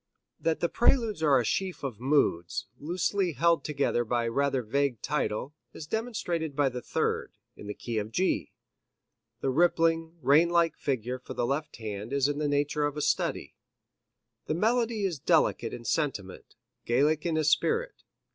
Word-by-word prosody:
That 165 -1 0
the 170 - +3
Preludes 230 -3 +2
are 145 -4 +5
a 120 - -1
sheaf 185 - -2
of 125 -6 -4
moods, 125 - +1
loosely 180 +3 0
held 170 +5 +2
together 140 -5 0
by 120 +1 0
the 115 - -1
rather 140 0 +1
vague 135 +1 0
title, 135 -2 -2 0.2
is 155 - -8
demonstrated 175 - -2
by 145 -2 +3
the 125 -1 -6
third, - - -2 0.2
in 105 - -10
the 105 - -5
key 115 -2 -3
of 105 +1 -4
G. 185 +11 0 0.9
The 135 - 0
rippling, 165 +1 +2
rain 150 +6 +5
like 170 -2 +2
figure 125 -2 -2
for 125 - -9
the 120 - 0
left 145 +5 -2
hand 110 +1 -6
is 140 -1 +3
in 145 0 -2
the 150 - 0
nature 145 +1 +1
of 145 0 -6
a - - -1
study. 145 -1 -1 0.9
The 155 - 0
melody 225 +2 +1
is 170 -7 -2
delicate 155 -7 +2
in 120 - -8
sentiment, 120 - -3 0.3
Gallic 145 +6 +2
in 165 -2 0
its 155 -1 +3
esprit. 460 - +1
145 Hz, 170 wpm, -28 LUFS, 125-170 Hz, 0.9 s, are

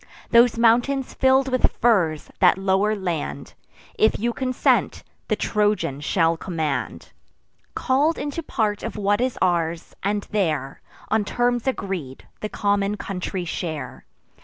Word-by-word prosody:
Those 235 0 +5
mountains 245 +4 +2
fill'd 265 0 +3
with 255 -1 +2
firs, 180 -10 +1
that 180 -1 +5
lower 195 +2 +1
land, 175 -6 -4 0.5
If 220 - +4
you 235 +2 -1
consent, 255 0 +1 0.2
the - - +1
Trojan 205 -10 0
shall 165 +1 +1
command, 155 - -3 0.6
Call'd 290 +5 +1
into 290 +3 -4
part 215 -9 -1
of 230 - -5
what 205 +2 +1
is 255 -1 -1
ours; 170 -2 -1
and 205 +1 -1
there, 155 -10 -1 0.3
On 220 -1 +2
terms 245 +3 0
agreed, 185 - -4
the 215 - -4
common 205 0 0
country 185 -2 -4
share. 160 -2 -5
205 Hz, 130 wpm, -23 LUFS, 170-240 Hz, 0.6 s, Those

